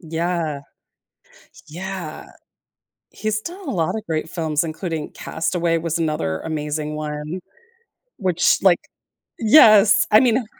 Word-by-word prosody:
Yeah. 165 Hz, -3 st, -2 dB, 1.1 s
Yeah. 180 Hz, -1 st, -7 dB, 0.9 s
He's 215 Hz, 0 st, -2 dB
done 360 Hz, -, -8 dB
a -, -, -2 dB
lot 165 Hz, +2 st, -1 dB
of 220 Hz, 0 st, -5 dB
great 160 Hz, 0 st, -3 dB
films, 160 Hz, -3 st, -1 dB
including 160 Hz, -1 st, -4 dB
Castaway, 165 Hz, 0 st, -1 dB
was 165 Hz, 0 st, -2 dB
another 150 Hz, -, -1 dB
amazing 150 Hz, -1 st, -3 dB
one, 150 Hz, +3 st, -5 dB, 0.8 s
which 185 Hz, -5 st, +2 dB
like 185 Hz, -3 st, +5 dB, 0.6 s
Yes, 215 Hz, -4 st, +6 dB
I 215 Hz, -, +7 dB
mean, 245 Hz, -2 st, +2 dB
165 Hz, 115 wpm, -21 LUFS, 155-200 Hz, 1.1 s, I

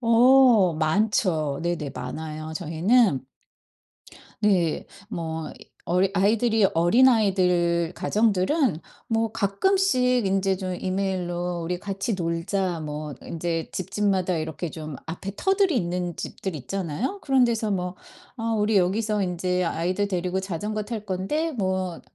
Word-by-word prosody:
어 235 Hz, -5 st, +5 dB
많죠. 160 Hz, -3 st, +1 dB
네네. 170 Hz, -5 st, -2 dB
많아요. 155 Hz, +4 st, -6 dB
저희는 170 Hz, -, +2 dB, 1.2 s
네. 180 Hz, -6 st, +2 dB, 0.2 s
뭐 160 Hz, -4 st, -4 dB, 0.3 s
어리 185 Hz, +2 st, +2 dB
아이들이 220 Hz, +2 st, +3 dB
어린아이들 180 Hz, -4 st, +3 dB
가정들은 215 Hz, -, +1 dB, 0.3 s
뭐 225 Hz, -1 st, 0 dB
가끔씩 250 Hz, -, +2 dB
인제 195 Hz, 0 st, +1 dB
좀 185 Hz, -1 st, -4 dB
이메일로 180 Hz, -2 st, -2 dB
"우리 175 Hz, +2 st, -2 dB
같이 195 Hz, +3 st, -3 dB
놀자." 175 Hz, +1 st, -1 dB
뭐 150 Hz, -1 st, -5 dB
인제 165 Hz, 0 st, -3 dB
집집마다 190 Hz, -1 st, 0 dB
이렇게 160 Hz, +1 st, -4 dB
좀 155 Hz, -3 st, -7 dB
앞에 175 Hz, +4 st, -5 dB
터들이 385 Hz, -5 st, +2 dB
있는 175 Hz, -3 st, -2 dB
집들 190 Hz, -3 st, -5 dB
있잖아요. 190 Hz, -, -3 dB
그런 265 Hz, -2 st, +3 dB
데서 225 Hz, -3 st, 0 dB
뭐 180 Hz, -1 st, -2 dB, 0.4 s
"어 225 Hz, 0 st, -1 dB
우리 210 Hz, 0 st, +2 dB
여기서 210 Hz, +3 st, +1 dB
인제 180 Hz, 0 st, -1 dB
아이들 180 Hz, +4 st, -1 dB
데리고 185 Hz, 0 st, -1 dB
자전거 205 Hz, +3 st, -3 dB
탈 220 Hz, -1 st, -5 dB
건데 210 Hz, -, -1 dB
뭐 185 Hz, -5 st, -2 dB
190 Hz, 255 characters per minute, -25 LUFS, 170-215 Hz, 1.2 s, 어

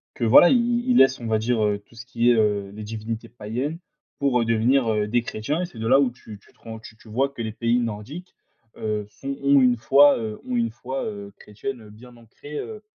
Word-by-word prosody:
que 120 Hz, -, -5 dB
voilà, 125 Hz, +9 st, +7 dB
ils 240 Hz, 0 st, +1 dB
ils 245 Hz, -, +4 dB
laissent 135 Hz, 0 st, +5 dB
on 120 Hz, -, -8 dB
va 110 Hz, -1 st, +1 dB
dire, 115 Hz, 0 st, 0 dB
heu, 105 Hz, -1 st, 0 dB
tout -, -, -22 dB
ce 115 Hz, +1 st, -10 dB
qui 120 Hz, -1 st, +1 dB
est, 120 Hz, -, +4 dB
heu, 105 Hz, -2 st, +1 dB
les 105 Hz, -, -8 dB
divinités 110 Hz, +2 st, -6 dB
païennes 120 Hz, +8 st, -5 dB, 0.4 s
pour, 135 Hz, -3 st, +2 dB
heu, -, -, 0 dB
devenir, 115 Hz, +3 st, +2 dB
heu, 105 Hz, -1 st, 0 dB
des 120 Hz, +2 st, 0 dB
chrétiens 145 Hz, +11 st, -3 dB
et -, -, -1 dB
c'est 150 Hz, -10 st, -12 dB
de 115 Hz, -, -3 dB
là 135 Hz, +3 st, +5 dB
où 130 Hz, -3 st, +2 dB
tu 110 Hz, -4 st, -12 dB
tu -, -, -25 dB
te -, -, -33 dB
rends 110 Hz, 0 st, -9 dB
tu 110 Hz, 0 st, -13 dB
tu 110 Hz, -, -18 dB
vois? 130 Hz, +6 st, 0 dB
Que 140 Hz, -4 st, -9 dB
les 110 Hz, -, -4 dB
pays 115 Hz, +2 st, +1 dB
nordiques, 120 Hz, -, -6 dB, 0.4 s
heu, 105 Hz, -1 st, -3 dB
sont 135 Hz, +5 st, -7 dB
ont 140 Hz, -1 st, +5 dB
une 125 Hz, -1 st, +3 dB
foi, 140 Hz, +5 st, +5 dB
heu, 110 Hz, -2 st, -5 dB
ont 125 Hz, -, -2 dB
une 115 Hz, -1 st, +1 dB
foi, 130 Hz, +3 st, -5 dB
heu, 100 Hz, -1 st, -7 dB
chrétiennes, 120 Hz, +4 st, -7 dB
heu, 105 Hz, -, -14 dB
bien 120 Hz, +3 st, -15 dB
ancrées, 120 Hz, +6 st, -11 dB
heu, 215 Hz, -1 st, -7 dB
115 Hz, 250 wpm, -23 LUFS, 110-135 Hz, 0.4 s, voilà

